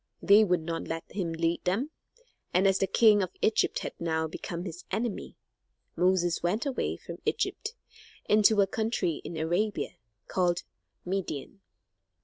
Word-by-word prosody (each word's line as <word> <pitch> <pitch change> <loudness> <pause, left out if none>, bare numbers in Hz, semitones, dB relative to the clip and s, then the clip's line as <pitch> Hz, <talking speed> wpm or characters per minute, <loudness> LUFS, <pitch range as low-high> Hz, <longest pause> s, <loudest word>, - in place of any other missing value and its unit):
They 205 +2 +6
would 180 -4 +2
not 165 +1 -4
let 165 0 -3
him 180 -4 -2
lead 165 +1 0
them, 225 - 0 0.6
and 190 +2 +5
as 195 0 +3
the 195 - +2
king 215 -2 +5
of 185 - -1
Egypt 220 - +2
had - - -4
now 160 -1 0
become 170 +2 -5
his 175 -1 -7
enemy, 220 +1 -3 0.6
Moses 180 -1 +2
went 200 - 0
away 275 -3 -1
from - - -9
Egypt 430 +3 -1 0.5
into 210 0 +5
a - - +5
country 205 -5 -1
in 170 - -6
Arabia, 175 +7 0 0.3
called 175 -2 +1 0.4
Midian. 190 -1 -4
185 Hz, 145 wpm, -29 LUFS, 170-210 Hz, 0.6 s, They